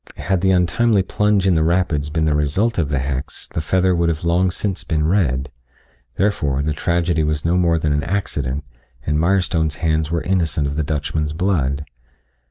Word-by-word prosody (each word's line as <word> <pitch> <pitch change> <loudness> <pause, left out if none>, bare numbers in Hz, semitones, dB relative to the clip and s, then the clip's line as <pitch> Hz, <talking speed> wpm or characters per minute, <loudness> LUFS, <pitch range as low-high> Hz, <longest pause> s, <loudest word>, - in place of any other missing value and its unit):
Had 95 -3 -1
the 95 - +2
untimely 95 +3 +2
plunge 105 0 +1
in 95 - +4
the 80 - +2
rapids 80 -3 +1
been 80 +1 0
the 75 - +2
result 80 +10 0
of 75 -5 0
the 70 - 0
hex 65 +1 -4
the - - -3
feather 95 +3 +2
would 85 -1 +1
have 80 -1 -3
long 85 +2 +2
since 95 +1 -3
been 75 -1 0
red, 70 -8 +1 0.6
therefore, 75 -9 0
the 75 +1 0
tragedy 85 +1 0
was 75 0 -1
no 85 +2 +2
more 85 -2 +3
than 75 -2 0
an 75 - +1
accident 75 -7 -2 0.4
and 75 0 0
Mirestone's 85 -3 +1
hands 80 -1 0
were 85 -1 -1
innocent 80 -5 0
of 70 0 -2
the 80 - 0
Dutchman's 75 +1 -2
blood. 75 -6 0
80 Hz, 185 wpm, -20 LUFS, 75-90 Hz, 0.6 s, in